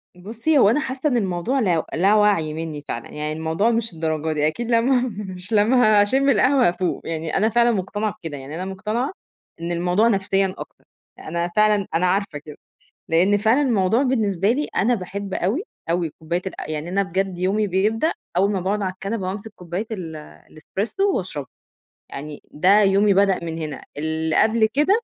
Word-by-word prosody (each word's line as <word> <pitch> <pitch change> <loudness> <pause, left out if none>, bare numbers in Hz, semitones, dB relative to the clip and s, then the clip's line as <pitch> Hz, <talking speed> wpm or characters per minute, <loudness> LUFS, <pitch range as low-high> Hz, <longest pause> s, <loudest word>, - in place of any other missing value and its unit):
بُصّي، 225 - -1
هو 200 - +6
أنا 235 - +2
حاسّة 275 0 -2
إن 245 - +1
الموضوع 195 +6 -1
لا 175 -9 +1
لا 190 +5 +3
وعي 200 -8 +2
منّي 160 -2 -5
فعلًا، 115 - -5
يعني 150 0 -4
الموضوع 160 +8 0
مش 230 -3 -1
للدرجة 160 -1 -2
دي 150 0 +1
أكيد 235 +9 -3
لمّا 245 +2 +3 0.3
مش 185 +5 -7
لمّا 215 0 +5
هاشِمّ 265 +7 +2
القهوة 255 0 +4
هافوق، 175 +1 -1
يعني 160 -1 -2
أنا 215 +3 +3
فعلًا 240 +1 +3
مقتنعة 205 +1 -2
بكده، 160 -4 -6
يعني 135 +3 -8
أنا 180 +3 -4
مقتنعة 215 - -3 0.5
إن 170 +1 -3
الموضوع 180 +5 +2
نفسيًا 195 -2 +1
أكتر، - - -11 0.3
أ - - -11
أنا 170 +2 -1
فعلًا 210 -2 +3
أنا 175 +3 +2
عارفة 180 -4 0
كده، 150 0 -11 0.5
لإن 180 +5 +3
فعلًا 220 +7 +3
الموضوع 225 -2 +2
بالنسبة 210 -7 +1
لي 290 +4 -1
أنا 225 +7 +3
باحب 200 -1 -5
أوي، 215 - 0 0.3
أوي 170 -1 0
كوباية 170 +3 -2
الق 185 - -6
يعني 155 +1 -4
أنا 195 +3 +1
بجد 190 -1 -2
يومي 200 +4 +1
بيبدأ 210 - +1 0.2
أول 195 +3 +3
ما 195 -2 -1
باقعُد 200 +3 -1
على 185 -1 -1
الكنبة 195 +1 -4
وأمسك 205 +3 -6
كوباية 180 +4 -5
ال 175 -7 -5 0.4
الespresso 210 - -4
واشربها، 150 -8 -4 0.6
يعني 150 +1 -8
ده 185 +7 +4
يومي 200 +1 +4
بدأ 195 -2 +2
من 165 -1 -4
هنا، 155 -2 -6
اللي 160 +1 -1
قبل 220 0 +3
كده 325 - +3
195 Hz, 180 wpm, -22 LUFS, 170-220 Hz, 0.6 s, هو